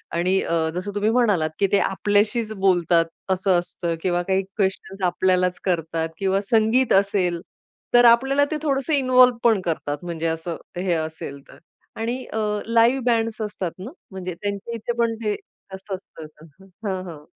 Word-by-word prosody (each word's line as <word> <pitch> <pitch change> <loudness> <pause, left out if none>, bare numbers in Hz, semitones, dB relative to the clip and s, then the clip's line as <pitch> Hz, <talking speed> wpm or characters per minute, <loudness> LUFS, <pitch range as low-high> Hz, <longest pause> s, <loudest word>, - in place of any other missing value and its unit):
आणि 185 +3 +2
अ, 165 -1 0
जसं 185 +3 -3
तुम्ही 205 +1 +1
म्हणालात 210 -10 +2
की 200 - +3
ते 200 - +4
आपल्याशीच 205 +4 +1
बोलतात 175 -4 +3 0.2
असं 190 -1 +2
असतं 170 -1 -4
किंवा 175 -1 +1
काही 190 +1 +1 0.2
क्वेशन्स 195 -1 -2
आपल्यालाच 180 0 +1
करतात 165 -2 -1
किंवा 195 +1 +1
संगीत 225 +3 +3
असेल. 190 -3 +2 0.5
तर 240 0 +7
आपल्याला 270 +4 +4
ते 310 - 0
थोडसं 280 0 0
इन्व्हॉल्व 255 -2 +5
पण 225 -4 +4
करतात 150 -3 -2
म्हणजे 165 -1 -3
असं, 165 +1 -3 0.2
हे 180 -1 0
असेल 155 -3 -4
तर - - -15 0.4
आणि 240 +3 -3
अ, 220 - -2 0.3
लाइव्ह 230 +3 +4
बँड्स 230 -2 +1
असतात 205 -5 -3
ना, 205 +8 -7 0.2
म्हणजे 185 -1 -5
त्यांच्या 205 +2 -4
इथे 230 +1 -3
पण 230 -1 +2
ते 210 -1 +1
जास्त 190 +1 -14
असतं 185 -4 -9 0.6
हां, 185 -1 -2
हां. 160 -4 -9
195 Hz, 160 wpm, -23 LUFS, 175-230 Hz, 0.6 s, तर